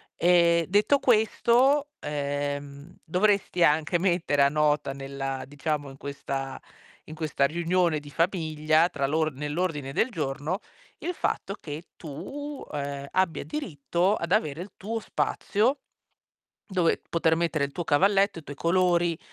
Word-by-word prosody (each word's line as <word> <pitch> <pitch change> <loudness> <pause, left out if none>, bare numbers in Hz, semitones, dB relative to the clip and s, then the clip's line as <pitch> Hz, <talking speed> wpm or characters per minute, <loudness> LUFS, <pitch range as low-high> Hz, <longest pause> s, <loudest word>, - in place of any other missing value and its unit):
Ehm, 170 -1 +4
detto 205 +9 +4
questo, 255 +4 +3
ehm, 145 +1 -4
dovresti 180 0 +2
anche 155 +3 +3
mettere 170 -6 +2
a 140 - +5
nota 150 -1 +1
nella 135 -1 -4
diciamo, 145 0 -3
in 135 - -12
questa 135 -1 -5 0.4
in 155 - -9
questa 155 -3 0
riunione 170 +1 +1
di 145 0 -12
famiglia 160 -1 +2
tra 140 -4 -1
l'or 155 +1 0
nell'ordine 150 0 -2
del 240 +9 +1
giorno, 155 +2 -2 0.4
il 355 - -3
fatto 195 - -2
che 150 +1 -7
tu, 270 - -7
ehm, 140 -1 -4
abbia 185 -3 +1
diritto 180 - -1
ad 170 +1 -4
avere 155 -7 +1
il 185 +1 -8
tuo 225 +4 -3
spazio, 230 +4 0 0.9
dove 180 -4 +1
poter 160 -1 +2
mettere 165 -3 0
il 140 - -5
tuo 175 - -4
cavalletto, 195 +4 +3
i - - -21
tuoi 145 - -8
colori, 175 -1 +2
165 Hz, 135 wpm, -27 LUFS, 145-185 Hz, 0.9 s, a